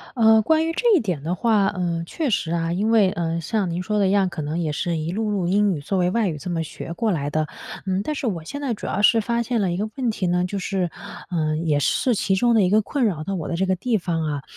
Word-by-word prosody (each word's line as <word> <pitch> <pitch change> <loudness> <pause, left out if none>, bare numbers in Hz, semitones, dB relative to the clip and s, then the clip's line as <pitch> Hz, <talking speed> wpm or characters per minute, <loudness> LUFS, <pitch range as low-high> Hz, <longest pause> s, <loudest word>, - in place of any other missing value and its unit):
呃， 220 -2 +5
关 320 +7 +2
于 330 - -1
这 465 +6 +3
一 - - +3
点 180 -10 -3
的 170 +4 -1
话， 215 -1 +2
呃， 175 -3 -2
确 300 - -2
实 170 -5 0
啊， 165 0 0
因 205 +5 0
为， 210 -4 +5
嗯， 170 -1 -2
像 195 +2 -1
您 170 +2 -2
说 210 +3 -1
的 195 -2 +3
一 - - +1
样， 195 -2 +3
可 165 -3 -5
能 150 +3 -3
也 160 -3 -1
是 170 +2 -1
一 160 +2 -3
路 215 +1 -1
路 190 -4 0
英 205 +2 +3
语 145 - -5
作 190 +7 -2
为 180 0 +2
外 220 -1 +1
语 155 - -4
这 180 - -6
么 165 -2 -1
学 165 +1 -7
过 225 +5 0
来 145 -6 -1
的。 155 0 0 0.4
嗯， 190 +1 0
但 305 - -3
是 280 - -3
我 180 -8 -2
现 285 - -6
在 265 -5 -1
主 - - -7
要 205 - -1
是 225 +1 +5
发 235 +2 0
现 235 0 -1
了 190 -3 +1
一 - - -2
个 210 +4 -2
问 250 -3 0
题 200 -4 -2
呢 180 0 +1
就 195 +2 -3
是 185 -2 -1 0.4
嗯， 155 -1 -1
也 150 -2 +2
是 245 - +1
其 195 -2 +1
中 235 +5 +3
的 220 - +5
一 180 - +2
个 215 +2 +5
困 260 +6 -1
扰 180 -9 0
到 195 - -3
我 165 -5 -4
的 170 - -2
这 190 - 0
个 190 0 +1
地 225 +4 0
方 170 -3 -2
啊。 145 -2 -2
190 Hz, 315 characters per minute, -23 LUFS, 170-220 Hz, 0.4 s, 呃